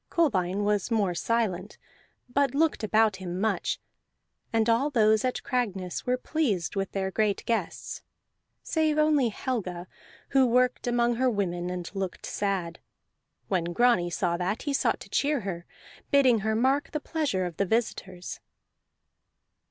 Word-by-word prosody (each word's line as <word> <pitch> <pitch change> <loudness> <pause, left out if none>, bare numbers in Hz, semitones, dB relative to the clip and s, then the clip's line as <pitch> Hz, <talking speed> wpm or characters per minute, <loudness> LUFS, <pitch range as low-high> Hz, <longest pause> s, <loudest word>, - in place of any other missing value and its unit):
Kolbein 205 - +1
was 205 0 +1
more 205 -6 +1
silent, 200 0 -1 0.5
but 275 +1 +1
looked 315 -5 +2
about 215 -1 +3
him 180 -1 -5
much; 220 +2 0 0.7
and 225 -1 +2
all 235 +6 +3
those 220 -5 +3
at 255 -1 -1
Cragness 200 -9 -2
were 250 0 +2
pleased 250 - -1
with 195 -1 -2
their 190 -1 -1
great 210 0 0
guests, 230 -1 -2 0.6
save 315 -2 +1
only 305 -5 +3
Helga, 195 -7 -3 0.4
who 270 -2 +4
worked 250 +1 +2
among 240 -1 +2
her 260 +1 +3
women 180 -5 -1
and 180 -1 -5
looked 195 -2 -4
sad. 195 -4 -2 0.7
When 180 -4 0
Grani 235 -6 +3
saw 170 0 0
that, 185 +5 -2
he 285 - -1
sought 275 - +1
to - - -10
cheer 290 -2 +1
her, 175 -4 -5 0.4
bidding 260 -5 +5
her 220 +2 0
mark 265 +5 +1
the 300 - 0
pleasure 290 - -1
of 175 -3 -6
the 200 - +1
visitors. 190 -5 -2
220 Hz, 145 wpm, -27 LUFS, 185-255 Hz, 0.7 s, bidding